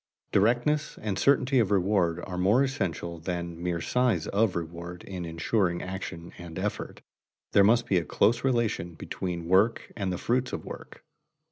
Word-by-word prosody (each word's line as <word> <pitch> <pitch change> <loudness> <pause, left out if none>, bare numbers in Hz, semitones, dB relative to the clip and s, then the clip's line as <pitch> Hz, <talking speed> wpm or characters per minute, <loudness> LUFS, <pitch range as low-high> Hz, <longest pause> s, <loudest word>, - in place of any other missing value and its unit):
Directness 120 +9 +2
and 100 -2 -2
certainty 135 -1 +4
of 110 -5 +2
reward 90 -3 +2
are 95 - -6
more 100 +9 +4
essential 85 -10 -3
than 85 0 -4
mere 85 -1 -1
size 120 -7 +1
of 105 -1 +1
reward 85 +1 -6
in 90 -3 -6
insuring 85 +2 0
action 90 -3 -6
and 85 -2 -8
effort. - - -4 0.5
There 100 - +6
must 115 +4 +4
be 95 - +3
a - - -4
close 110 +9 +2
relation 115 -9 0
between 85 +1 -4
work 95 +7 +2
and 100 -3 -2
the 90 - -2
fruits 125 +5 0
of - - -4
work. - - -10
95 Hz, 160 wpm, -28 LUFS, 85-115 Hz, 0.5 s, There